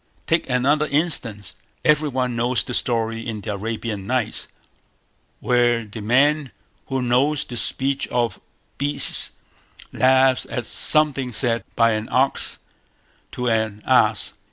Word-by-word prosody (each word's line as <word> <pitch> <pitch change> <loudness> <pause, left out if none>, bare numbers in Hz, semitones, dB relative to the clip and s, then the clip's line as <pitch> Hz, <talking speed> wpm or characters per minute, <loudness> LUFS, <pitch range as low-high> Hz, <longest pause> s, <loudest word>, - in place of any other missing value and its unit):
Take 165 -3 0
another 140 +4 +1
instance. 140 -10 0 0.3
Every 150 0 +3
one 125 -2 -2
knows 120 +1 0
the 125 - -7
story 115 -2 0
in 110 -3 -5
the 105 - -4
Arabian 105 -1 -5
Nights, 125 -2 -2 0.9
where 120 -2 +1
the 105 +1 -9
man 140 +6 +2 0.4
who 135 -1 -2
knows 135 +5 +1
the 120 - -8
speech 135 +4 0
of 120 -2 -2 0.4
beasts 145 +1 +3 0.6
laughs 130 +1 +3
at 120 - -4
something 145 -5 +2
said 115 +1 0
by 115 0 +3
an 110 0 -3
ox 135 +2 +1 0.8
to 125 - -3
an 110 -2 -1
ass. - - +2
125 Hz, 130 wpm, -21 LUFS, 115-135 Hz, 0.9 s, Every